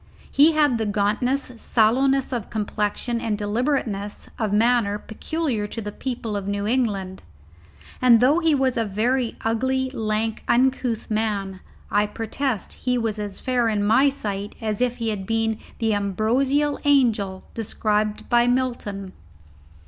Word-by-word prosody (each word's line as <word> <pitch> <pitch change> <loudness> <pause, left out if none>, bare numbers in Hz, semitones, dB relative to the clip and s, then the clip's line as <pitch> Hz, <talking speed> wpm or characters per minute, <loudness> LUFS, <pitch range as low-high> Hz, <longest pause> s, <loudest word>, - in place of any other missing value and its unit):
He 305 +3 +6
had 295 -6 +3
the 220 - -1
gauntness, 215 +7 0
sallowness 265 +4 +2
of 235 -4 -3
complexion, 215 +2 -2
and 215 -2 -1
deliberateness 210 -2 -2
of 215 -3 0
manner 220 -1 +3
peculiar 230 0 -3
to 230 - -6
the 210 -2 -5
people 230 -2 -4
of 200 -1 -3
New 200 0 -2
England. 205 -6 -1 0.8
And 245 -3 +7
though 275 +7 +4
he 325 -3 +3
was 265 -3 +1
a 230 - +2
very 230 +4 0
ugly, 260 +3 0
lank, 220 -2 -2
uncouth 250 -3 +1
man, 205 -3 -1 0.3
I 210 0 +3
protest 225 +2 -3
he 250 -1 -1
was 225 -2 -2
as 205 -2 -5
fair 245 -3 +1
in 210 -2 0
my 240 +7 +5
sight 205 -7 -5
as 215 -1 -2
if 245 -1 +1
he 230 -1 -1
had 195 -3 -4
been 225 -1 0 0.2
the 225 -2 +1
ambrosial 245 +9 +1
angel 225 -10 +2
described 215 -1 -1
by 240 0 +4
Milton. 235 -7 -1
225 Hz, 145 wpm, -23 LUFS, 210-255 Hz, 0.8 s, And